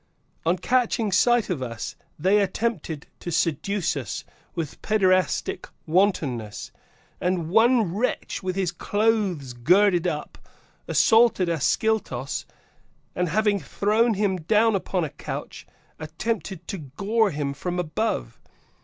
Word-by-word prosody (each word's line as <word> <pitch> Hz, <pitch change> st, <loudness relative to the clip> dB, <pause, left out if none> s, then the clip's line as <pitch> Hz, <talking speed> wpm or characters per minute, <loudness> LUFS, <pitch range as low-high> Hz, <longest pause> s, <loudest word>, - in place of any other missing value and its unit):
(On 175 Hz, +2 st, +3 dB
catching 235 Hz, -2 st, +1 dB
sight 235 Hz, +2 st, +3 dB
of 155 Hz, -7 st, -2 dB
us, 115 Hz, -3 st, -5 dB, 0.2 s
they 190 Hz, +7 st, +3 dB
attempted 190 Hz, -6 st, -2 dB
to 175 Hz, -, -5 dB
seduce 170 Hz, +3 st, 0 dB
us 125 Hz, -9 st, -4 dB, 0.3 s
with 160 Hz, -3 st, -5 dB
paederastic 185 Hz, -5 st, +1 dB, 0.2 s
wantonness, 155 Hz, -, 0 dB, 0.5 s
and 175 Hz, -2 st, -1 dB
one 225 Hz, -3 st, +4 dB
wretch, 225 Hz, +6 st, -2 dB
with 185 Hz, -1 st, -3 dB
his 190 Hz, -3 st, 0 dB
clothes 200 Hz, -, 0 dB
girded 180 Hz, +8 st, +3 dB
up, 150 Hz, -3 st, -4 dB, 0.5 s
assaulted 225 Hz, -6 st, +4 dB
Ascyltos, 165 Hz, -, 0 dB, 0.7 s
and, 180 Hz, -1 st, 0 dB
having 210 Hz, +3 st, +2 dB
thrown 215 Hz, -, +1 dB
him 195 Hz, -2 st, +1 dB
down 215 Hz, +7 st, +3 dB
upon 185 Hz, -2 st, -1 dB
a 150 Hz, -, -3 dB
couch, -, -, -7 dB, 0.3 s
attempted 175 Hz, +2 st, -4 dB
to 195 Hz, -, -4 dB
gore 200 Hz, -, 0 dB
him 145 Hz, -4 st, -2 dB
from 180 Hz, +5 st, -4 dB
above. 180 Hz, +6 st, -2 dB
185 Hz, 120 wpm, -25 LUFS, 160-215 Hz, 0.7 s, one